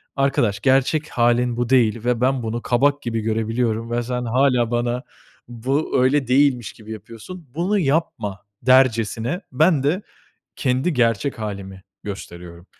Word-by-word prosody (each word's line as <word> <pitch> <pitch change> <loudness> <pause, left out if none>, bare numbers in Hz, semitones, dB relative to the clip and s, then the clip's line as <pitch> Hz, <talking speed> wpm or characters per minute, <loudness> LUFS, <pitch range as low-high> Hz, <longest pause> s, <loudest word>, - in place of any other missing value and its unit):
"Arkadaş, 120 -6 +1
gerçek 135 +4 +2
hâlin 120 0 +1
bu 120 0 -1
değil 120 -3 +2
ve 125 -1 0
ben 130 -1 +1
bunu 115 +1 -3
kabak 140 +4 +1
gibi 115 -3 -2
görebiliyorum 115 +1 -1
ve 120 0 0
sen 125 0 -3
hâlâ 125 -1 +2
bana 120 +2 -1 0.4
bu, 130 +3 -1
öyle 135 0 +2
değilmiş 130 -3 +2
gibi 110 0 -12
yapıyorsun, 115 - -10
bunu 195 +5 +1
yapma." 135 - -1 0.2
dercesine 130 - +2
ben 150 +1 +3
de 170 +8 +1 0.6
kendi 130 +6 0
gerçek 120 0 0
hâlimi 100 -3 -6 0.2
gösteriyorum. 85 -3 -9
120 Hz, 135 wpm, -21 LUFS, 115-135 Hz, 0.6 s, ben